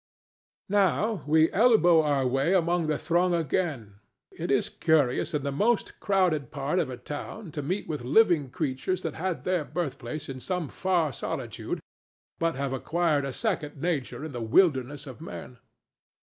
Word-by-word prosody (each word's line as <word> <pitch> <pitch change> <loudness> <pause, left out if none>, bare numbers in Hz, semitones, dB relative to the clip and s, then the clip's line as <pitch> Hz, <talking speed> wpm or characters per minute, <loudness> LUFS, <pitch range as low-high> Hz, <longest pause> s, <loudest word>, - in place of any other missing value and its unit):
Now 200 - +2
we 160 +1 +4
elbow 195 -7 +5
our 145 -3 +1
way 135 +8 +2
among 170 -2 +2
the 150 -1 +1
throng 175 +3 +1
again. 145 - -2 0.3
It - - -5
is - - +2
curious 150 -2 +1
in 145 - -1
the 140 - -1
most 210 +11 0
crowded 180 -9 +1
part 145 +4 -1
of 160 -6 0
a 125 - -6
town 145 - -7
to 150 - -4
meet 185 +8 -3
with 150 -5 -4
living 150 - +4
creatures 155 +5 -2
that 160 - -2
had 185 +1 -3
their 180 -3 0
birthplace 155 -2 -4
in 135 -1 -6
some 180 0 -3
far 175 -6 0
solitude, - - -4 0.6
but 165 -3 +1
have 135 0 -2
acquired 155 +1 0
a 135 - -3
second 150 - -3
nature 155 -2 -2
in 160 - -6
the 120 -3 -5
wilderness 140 +2 +2
of 135 +1 -10
men. 125 -6 -9
155 Hz, 160 wpm, -27 LUFS, 135-180 Hz, 0.6 s, elbow